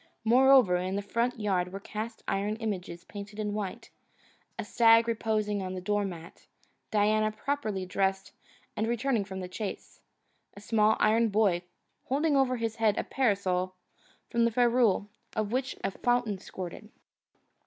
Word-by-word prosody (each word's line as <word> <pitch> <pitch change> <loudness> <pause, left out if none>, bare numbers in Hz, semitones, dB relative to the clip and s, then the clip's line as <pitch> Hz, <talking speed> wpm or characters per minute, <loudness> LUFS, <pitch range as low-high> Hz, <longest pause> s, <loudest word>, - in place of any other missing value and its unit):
Moreover, 250 -4 +6
in 185 +2 -2
the 200 - -2
front 235 +3 -1
yard 185 -4 0
were 195 - -6
cast 220 +3 -6
iron 205 +2 0
images 190 -6 -4
painted 205 0 -9
white: 205 -3 -5 0.7
a - - -4
stag 230 0 +5
reposing 215 -3 0
on 185 0 -4
a - - -3
door 205 +2 0
mat; 170 -3 -9 0.4
Diana 215 +1 +2
properly 215 -5 -3
dressed 190 +1 -1 0.4
and 220 +1 -1
returning 240 -1 0
from 190 -1 -7
the 180 - -5
chase; 200 +2 -6 0.6
a - - -7
small 215 +1 +2
iron 225 +2 +3
boy 200 -4 +2 0.4
holding 290 +3 +1
over 260 -2 +2
his 225 -1 -3
head 220 -2 +2
a - - 0
parasol 190 -7 0 0.6
from 235 0 +2
the 235 - +2
ferrule 235 -4 +3 0.3
of 215 -2 -1
which 260 +2 -1
a - - 0
fountain 240 -2 0
squirted. 185 +3 -8
215 Hz, 150 wpm, -29 LUFS, 195-230 Hz, 0.7 s, Moreover